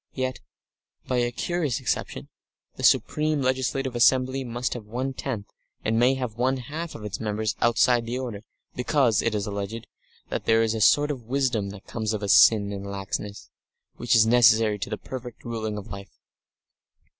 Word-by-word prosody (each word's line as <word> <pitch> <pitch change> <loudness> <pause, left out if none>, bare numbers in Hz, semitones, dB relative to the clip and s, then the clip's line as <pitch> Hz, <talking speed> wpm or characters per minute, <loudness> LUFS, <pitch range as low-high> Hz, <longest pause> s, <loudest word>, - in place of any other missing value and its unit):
Yet, 130 -1 -2 0.7
by 125 - -1
a 120 0 +1
curious 155 -1 -1
exception, 65 - -3 0.5
the - - -9
supreme 155 0 +2
legislative 130 0 -1
assembly 130 +2 +3
must 120 0 -3
have 115 -4 -8
one 130 +5 -3
tenth, 120 -6 -4 0.4
and 115 +1 +1
may 125 +3 +4
have 125 -4 -4
one 130 +2 +2
half 155 +7 -6
of 105 - -8
its 105 - -5
members 110 0 -2
outside 120 0 +3
the 120 +2 -2
order, 120 -6 -5 0.3
because, 125 -3 +2
it 115 -2 0
is 100 -2 -1
alleged, 105 +3 -5 0.4
there 115 0 +1
is 110 -1 0
a 110 - -3
sort 145 +7 +4
of 125 -5 -6
wisdom 125 -6 0
that 100 -1 -11
comes 110 -1 -3
of 105 -1 -3
sin 100 -1 +6
and 100 0 -6
laxness, 100 +1 -5 0.5
which 120 -1 +1
is 110 -1 +6
necessary 110 -2 +4
to - - -4
the 105 - -3
perfect 125 -1 -9
ruling 110 -2 -3
of 100 - -7
life. 100 0 -9
115 Hz, 170 wpm, -25 LUFS, 105-130 Hz, 0.7 s, sin